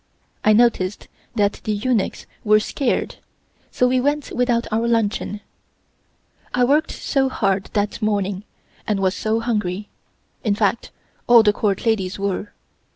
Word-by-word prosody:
I 215 - +5
noticed 210 -4 +2 0.3
that 205 -2 +1
the 215 - -1
eunuchs 215 0 -1 0.2
were 215 0 +5
scared, 245 +3 -2 0.5
so 250 - +2
we 255 0 +2
went 290 +2 -1
without 245 -1 +1
our 225 +2 +1
luncheon. 215 -2 0 1.1
I 250 - +3
worked 295 +6 +3
so 270 -2 0
hard 195 -6 0
that 205 +2 -1
morning, 200 -2 -1 0.4
and 210 -2 0
was 190 -1 +1
so 220 +2 -1
hungry 210 -4 -2 0.5
in 210 -4 +1
fact 210 +2 0 0.4
all 235 -2 +8
the 210 -1 +4
Court 205 -1 -1
ladies 200 -4 0
were. 200 +1 -3
215 Hz, 140 wpm, -21 LUFS, 200-240 Hz, 1.1 s, all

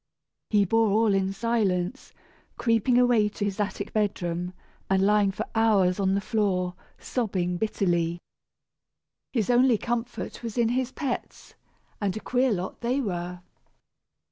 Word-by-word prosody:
He 205 -2 +4
bore 225 +3 +3
all 215 +1 +3
in 195 0 +1
silence, 210 0 -1 0.5
creeping 230 +1 +2
away 240 -4 +4
to 205 0 -3
his 205 0 -3
attic 200 -1 -3
bedroom, 180 -4 -1 0.3
and 190 0 +3
lying 205 -1 +4
for 215 +3 -4
hours 205 -5 +3
on 190 -1 +2
the - - +2
floor 190 -4 0 0.2
sobbing 185 -7 -2
bitterly. 175 -5 0 1.1
His 230 -2 +1
only 245 -1 +5
comfort 240 +1 -4
was 230 -2 -6
in 235 -1 +3
his 255 +1 0
pets, 265 -4 -5 0.5
and 200 -1 -1
a - - -3
queer 255 +2 +1
lot 185 -2 -3
they 245 +3 0
were. 180 -6 -3
210 Hz, 140 wpm, -26 LUFS, 190-235 Hz, 1.1 s, only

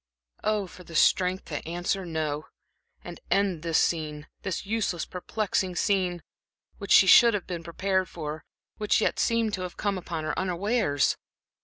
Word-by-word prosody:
Oh, 210 -2 +1
for 180 0 -13
the 165 -1 -11
strength 185 +3 +3
to 150 - -5
answer 175 +2 -2
"No," 155 -2 -3 0.6
and - - -9
end 195 -5 +1
this 165 -1 +1
scene 150 -3 0
this 190 0 -3
useless, 200 -5 -1
perplexing 185 0 -2
scene, 180 -3 0 0.6
which 200 - -7
she - - +8
should 230 +4 +7
have 200 - -3
been 175 -2 -5
prepared 190 +2 -1
for, 155 -1 -6 0.3
which 210 -1 +2
yet - - 0
seemed 230 -2 +1
to 190 - -2
have 180 -1 -6
come 200 -2 -1
upon 170 -2 -5
her 155 - -2
unawares! 185 - +1
180 Hz, 160 wpm, -27 LUFS, 165-200 Hz, 0.6 s, she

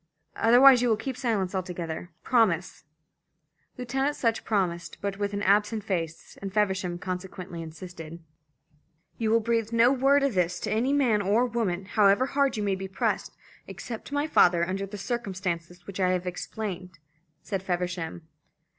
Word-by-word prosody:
Otherwise 245 +2 +7
you 245 - +2
will 220 - +3
keep 260 +4 -4
silence 215 -7 -1
altogether. 175 -2 -4
Promise!" 190 -10 +1 0.9
Lieutenant 270 +4 -1
Sutch 230 -6 0
promised, 180 -5 -1
but 200 0 -4
with 205 0 -1
an 200 0 -3
absent 210 +2 +2
face, 165 -5 -4
and 195 -1 -5
Feversham 190 -3 0
consequently 180 -1 -6
insisted. 165 0 -9 1.0
"You 225 -2 0
will 230 +1 +4
breathe 230 0 0
no 230 +2 +5
word 275 +1 +3
of 275 -3 +1
this 180 -1 0
to 235 +5 0
man 245 -7 +3
or 210 +5 +2
woman, 205 -7 -2
however 205 +4 +4
hard 275 -2 +1
you 210 - -1
may 200 -1 +1
be 190 0 -4
pressed, 190 - -2 0.3
except 230 -2 -7
to 290 - -5
my 290 +1 +1
father 175 - +4
under 195 +1 -3
the 205 +2 -8
circumstances 185 -5 -4
which 195 0 -8
I 185 -1 +3
have 180 0 -2
explained," 185 -1 -5 0.5
said 195 -3 -3
Feversham. 175 -3 -3
200 Hz, 155 wpm, -27 LUFS, 180-230 Hz, 1.0 s, Otherwise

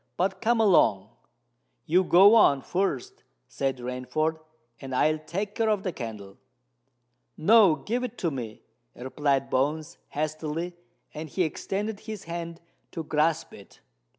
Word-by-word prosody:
"But 190 +1 -1
come 235 +1 +2
along." 110 - +3 0.8
"You 180 +4 +3
go 190 +4 +7
on 140 -12 +5
first," 180 -9 -2 0.3
said 135 +1 -2
Rainford; 125 +6 -2 0.4
"and 135 -1 -6
I'll 155 +4 +2
take 195 +7 -4
care 225 0 0
of 210 -2 0
the 185 - -3
candle." 105 -6 -8 1.0
"No—give 205 - +4
it 245 -1 -8
to 170 - -1
me," 115 -6 -7 0.3
replied 135 +2 -1
Bones 150 +4 -1
hastily; 155 +3 -3 0.4
and 155 +1 -7
he 185 - 0
extended 200 +6 -3
his 215 -3 -8
hand 170 0 -6 0.3
to 165 - -4
grasp 155 +1 0
it. - - -15
160 Hz, 130 wpm, -26 LUFS, 135-195 Hz, 1.0 s, go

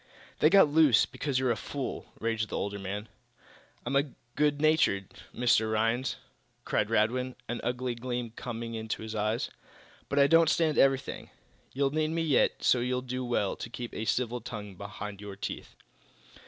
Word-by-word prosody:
"They 155 - +6
got 195 -2 +7
loose 145 -5 +5
because 140 -3 -2
you're 130 -1 +2
a - - +1
fool!" 140 +4 -5
raged 115 -1 -1
the - - -3
older 100 0 -3
man. 100 +3 -5 0.8
"I'm 140 +2 0 0.2
good 150 -1 +2
natured, 155 - +3 0.2
Mr. 115 -2 +2
Rhinds" 115 +4 +1 0.5
cried - - 0
Radwin, 125 +4 +1
an 120 - -3
ugly 125 0 -1
gleam 120 -1 -4
coming 115 -1 -6
into 110 -1 -4
his 110 0 -6
eyes, 110 +2 -1 0.6
"but 140 - -2
I 140 - +7
don't 165 +2 +5
stand 155 -2 +2
everything. 135 0 +2 0.4
You'll 135 0 +1
need 155 +1 0
me 165 +1 -1
yet 150 -5 +2
so 125 - +4
you'll 125 +1 -1
do 130 0 -3
well 120 -5 0
to - - -6
keep 120 0 -6
a 110 - -3
civil 120 +1 0
tongue 105 -3 -7
behind 100 +1 -7
your 100 -1 -7
teeth!" 100 - -6
120 Hz, 170 wpm, -29 LUFS, 110-140 Hz, 0.8 s, got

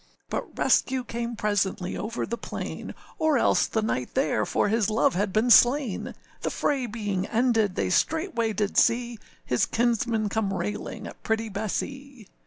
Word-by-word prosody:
But - - -4
rescue 260 -1 +2
came 235 0 -4
presently 200 -3 -1
over 225 +3 -3
the 235 - -3
plain, - - -6 0.2
Or 315 -3 +3
else - - +3
the 220 - -1
knight 125 - -2
there 260 -2 +1
for - - +1
his 220 0 +1
love 215 -3 +2
had 195 +2 0
been 220 +5 +2
slain; 245 -2 +4 0.3
The - - -1
fray 270 -4 0
being 205 -4 -3
ended, 225 -4 +2
they 95 -2 -1
straightway 315 - +1
did 210 -1 -1
see 235 -1 +2 0.3
His 125 - +1
kinsman 230 -2 +1
come 200 -1 -1
railing 210 +2 -4
at - - -10
pretty 225 0 -1
Bessee. 235 +4 -5
225 Hz, 160 wpm, -26 LUFS, 205-245 Hz, 0.3 s, slain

